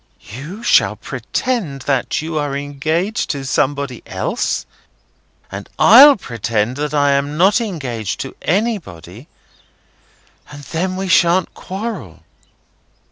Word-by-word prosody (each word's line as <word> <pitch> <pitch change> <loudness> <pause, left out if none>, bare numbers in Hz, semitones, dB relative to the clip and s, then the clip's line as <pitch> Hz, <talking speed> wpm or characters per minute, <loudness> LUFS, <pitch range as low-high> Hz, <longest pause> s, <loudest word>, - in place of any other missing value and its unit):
You 165 - -8
shall - - +4
pretend 190 - -3
that 135 +2 -1
you 160 0 -5
are 145 -2 -2
engaged 155 +8 -2
to 140 -2 -3
somebody 135 -1 -1
else, - - -2 0.9
and - - -7
I'll 275 +6 +9
pretend 115 - -2
that 150 0 -2
I 145 -1 +3
am 140 +2 0
not 195 +7 +4
engaged 130 - -4
to 135 - -7
anybody, 150 - -3 1.2
and 145 0 -11
then 185 +5 -2
we 190 +1 -3
shan't 180 0 +3
quarrel." 190 - -6
145 Hz, 115 wpm, -18 LUFS, 135-190 Hz, 1.2 s, I'll